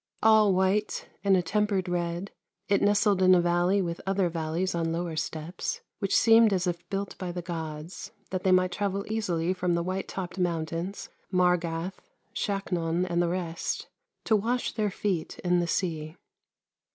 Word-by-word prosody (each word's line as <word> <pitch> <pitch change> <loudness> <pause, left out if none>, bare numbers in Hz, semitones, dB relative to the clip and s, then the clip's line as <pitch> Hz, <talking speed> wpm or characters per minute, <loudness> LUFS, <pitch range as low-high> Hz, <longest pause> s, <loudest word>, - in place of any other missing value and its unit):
All 215 -2 +6
white 190 +3 +1 0.2
and 195 -1 +5
a 180 - +1
tem 210 +5 +1
pered 190 -3 -1
red, 175 +2 -2 0.4
it 200 - +2
nestled 205 -1 +3
in 185 0 +7
a - - +5
valley 175 +3 +2
with 170 -1 -4
other 195 -2 +2
valleys 165 +3 -2
on 165 -1 -1
lower 170 0 -2
steppes, 160 +2 -4 0.2
which 195 -3 +2
seemed 225 -1 +6
as 185 -1 +1
if 175 -1 -3
built 195 0 -3
by 180 -2 -3
the 175 0 -5
gods, 160 +3 -6 0.2
that 185 -1 -1
they 190 - +3
might 185 0 +4
travel 200 0 -2
easily 185 -6 0
from 180 -2 0
the 170 - 0
white 185 +2 -3
topped 190 0 -5
mountains, 170 +2 -2 0.2
jMargath, 180 -1 +1 0.3
Shaknon, 180 -4 -1
and 175 -1 +1
the 175 - +1
rest, 170 -2 -3 0.3
to 220 - +3
wash 235 +4 0
their 215 -2 0
feet 190 -4 -2
in 180 -1 +3
the 175 - 0
sea. 160 -3 -2
180 Hz, 170 wpm, -28 LUFS, 170-195 Hz, 0.4 s, in